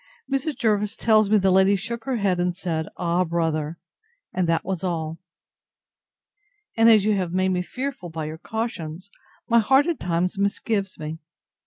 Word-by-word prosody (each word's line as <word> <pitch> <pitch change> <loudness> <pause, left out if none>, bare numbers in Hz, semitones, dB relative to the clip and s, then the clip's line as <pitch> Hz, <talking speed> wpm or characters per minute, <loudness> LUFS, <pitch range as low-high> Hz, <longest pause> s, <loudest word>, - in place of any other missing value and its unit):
Mrs. 275 0 -1
Jervis 210 -1 +1
tells 215 -2 +3
me 215 - +5
the 190 -1 +3
lady 190 +2 +5
shook 230 +4 -5
her 265 -2 -1
head, 195 -5 +1
and 175 0 0
said, 165 -4 -2
Ah! 175 +1 +1
brother! 165 -2 -1 0.6
and 180 -2 0
that 165 - +1
was 190 -1 -3
all. 165 -3 -2 1.6
And 225 0 +6
as 215 -3 +6
you 215 -1 +3
have 180 -3 -2
made 185 0 +2
me 180 -1 +1
fearful 255 -2 -5
by 160 -1 -5
your 155 +1 -6
cautions, 195 -5 -5 0.4
my 235 0 +5
heart 265 +6 +4
at 340 -2 -1
times 180 +3 -1
misgives 200 0 -1
me. 155 +1 -6
190 Hz, 170 wpm, -24 LUFS, 170-220 Hz, 1.6 s, And